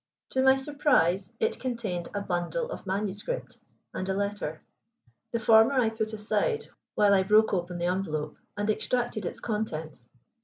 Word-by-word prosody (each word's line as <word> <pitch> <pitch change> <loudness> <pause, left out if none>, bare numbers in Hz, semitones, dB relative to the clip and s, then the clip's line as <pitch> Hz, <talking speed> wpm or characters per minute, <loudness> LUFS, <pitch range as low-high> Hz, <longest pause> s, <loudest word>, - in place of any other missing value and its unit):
To 260 - +2
my 265 0 +6
surprise, 255 - +2
it - - 0
contained 225 -9 -3
a 205 - -1
bundle 200 - -2
of 205 - -7
manuscript 205 - -3 0.3
and 185 - -3
a 190 - +1
letter. 200 -6 -3 0.7
The 235 - 0
former 225 +3 +6
I 245 -4 +3
put 220 -1 -2
aside, 225 - 0 0.3
while 205 -1 +5
I 195 - +5
broke 215 +3 +4
open 175 -1 -1
the 175 - -1
envelope 155 -5 -2 0.2
and 205 0 -1
extracted 220 -2 0
its - - -6
contents. 160 - -4
205 Hz, 155 wpm, -28 LUFS, 180-235 Hz, 0.7 s, my